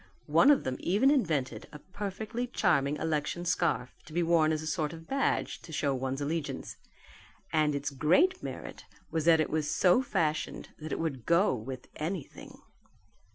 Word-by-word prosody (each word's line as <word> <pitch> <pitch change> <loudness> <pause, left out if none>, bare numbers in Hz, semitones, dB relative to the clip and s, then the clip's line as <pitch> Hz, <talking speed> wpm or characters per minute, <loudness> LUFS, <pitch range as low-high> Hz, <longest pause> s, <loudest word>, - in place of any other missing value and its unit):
One - - +5
of 290 - +5
them 130 0 -2
even 215 +10 +3
invented 160 - 0
a 150 - -8
perfectly 205 +7 -5
charming 150 - +1
election 160 +2 -2
scarf 170 -7 0
to 155 - -12
be 175 +1 +1
worn 165 -2 +3
as 155 0 -1
a - - -6
sort 155 0 -1
of 165 0 -10
badge 275 0 0
to 165 - -12
show 145 -2 0
one's 130 +1 -2
allegiance; 155 +1 -3 0.8
and 155 -2 +2
its 140 +1 -2
great 185 - +3
merit - - -7 0.3
was 160 -2 -1
that 165 -1 +6
it 155 - 0
was 155 -1 0
so 180 +7 +4
fashioned 160 -11 -1
that 155 0 -7
it - - -1
would 140 -8 -3
go 170 +5 +4
with 125 +2 -6
anything. 160 -1 -6
160 Hz, 170 wpm, -30 LUFS, 145-180 Hz, 0.8 s, that